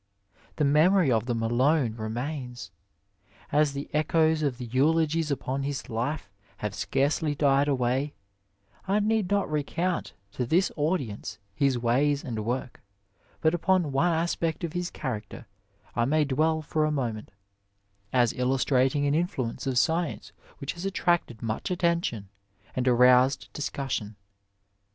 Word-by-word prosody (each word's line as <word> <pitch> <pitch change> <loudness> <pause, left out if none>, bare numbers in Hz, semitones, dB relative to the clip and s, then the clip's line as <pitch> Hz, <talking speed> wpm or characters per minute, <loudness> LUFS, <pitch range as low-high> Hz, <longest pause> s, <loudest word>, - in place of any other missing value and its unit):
The 150 - +1
memory 155 +2 +4
of 115 0 +1
them 115 -2 -1
alone 125 +2 +2
re 110 -1 -4
mains. 125 +1 -5 0.8
As 150 -1 +3
the 140 +1 -5
echoes 155 +1 +2
of 140 -5 0
the 125 - -6
eulogies 155 +5 +2
upon 135 -1 -2
his 140 -2 -4
life 120 +4 -2 0.3
have 105 -1 -4
scarcely 145 +6 0
died 140 0 +3
away, 135 +1 0 0.7
I 200 +2 +2
need 215 -2 +1
not 200 -1 +1
recount 165 +4 -2 0.2
to 125 - -3
this 175 +8 +2
audience 145 - -2 0.2
his 135 +2 +1
ways 135 +5 +1
and 115 -5 -4
work, 125 +2 -3 0.6
but 160 +1 +3
upon 175 -2 +2
one 165 +6 +2
aspect 165 +1 -1
of 165 -2 -3
his 175 0 -2
character 110 -7 -6 0.5
I 120 - +2
may 150 +3 +2
dwell 155 +3 +1
for 155 +1 0
a 155 - +1
moment, 120 -7 -3 0.8
as 120 -3 +3
illustrating 130 +2 +1
an 140 - +2
influence 140 -8 -2
of 130 -2 0
science 165 +3 0 0.3
which 140 -1 -4
has 170 - -8
attracted 175 - 0
much 115 - -3
attention 170 - 0 0.5
and 130 0 -1
aroused 125 +2 +4
discussion. 135 -7 -3
140 Hz, 140 wpm, -27 LUFS, 125-160 Hz, 0.8 s, memory